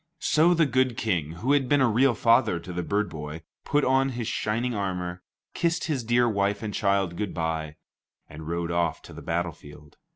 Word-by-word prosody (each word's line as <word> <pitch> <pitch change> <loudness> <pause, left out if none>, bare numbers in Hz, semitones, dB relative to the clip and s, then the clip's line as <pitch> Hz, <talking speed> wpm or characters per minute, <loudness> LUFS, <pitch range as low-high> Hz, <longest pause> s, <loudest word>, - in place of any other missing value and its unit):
So 165 +2 +3
the 165 -1 +4
good 130 -2 +1
King, 85 -8 -1
who 115 +11 -2
had 140 -3 +2
been 145 - +4
a 130 - +4
real 120 +2 +3
father 115 -5 +3
to 90 +2 -8
the 90 - -2
bird 100 +4 0
boy, 75 +1 -7 0.2
put 145 0 +1
on 135 +1 +3
his 115 -3 -3
shining 115 +3 -1
armor, 90 -3 -3 0.3
kissed 170 0 0
his 140 -6 -2
dear 120 +1 +3
wife 100 -1 0
and 105 -2 -4
child 100 -3 +1
good 105 +1 -4
bye, 80 -2 -2 0.5
and 75 +1 -10
rode 85 0 -2
off 85 -2 -1
to - - -12
the - - -9
battlefield. 75 -3 -5
100 Hz, 195 wpm, -26 LUFS, 85-125 Hz, 0.5 s, the